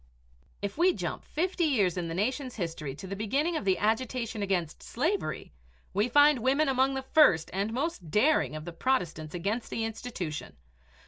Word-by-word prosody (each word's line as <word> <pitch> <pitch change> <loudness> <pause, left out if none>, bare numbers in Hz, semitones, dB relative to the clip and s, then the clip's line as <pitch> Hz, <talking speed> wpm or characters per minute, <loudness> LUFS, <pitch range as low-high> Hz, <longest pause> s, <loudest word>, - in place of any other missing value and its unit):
If 200 +8 -4
we 360 +1 +5
jump - - -4
fifty 350 +2 -1
years 205 - +2
in 175 -2 -2
the 165 - -4
nation's 255 +6 -1
history 165 - -4
to 190 - -9
the 195 +1 -5
beginning 275 - 0
of 310 - -2
the 190 -1 +3
agitation 225 0 -1
against 180 -6 -1
slavery, 330 - -2 0.4
we 205 +5 +1
find 290 +1 +6
women 275 +6 +2
among 270 0 +2
the 265 - -3
first 265 - +4
and 200 +3 -1
most 255 - -3
daring 210 - +3
of 155 0 -6
the 175 - -6
protestants 170 -8 -1
against 205 +7 -2
the 225 - -2
institution. 215 -9 -5
225 Hz, 175 wpm, -29 LUFS, 180-270 Hz, 0.4 s, find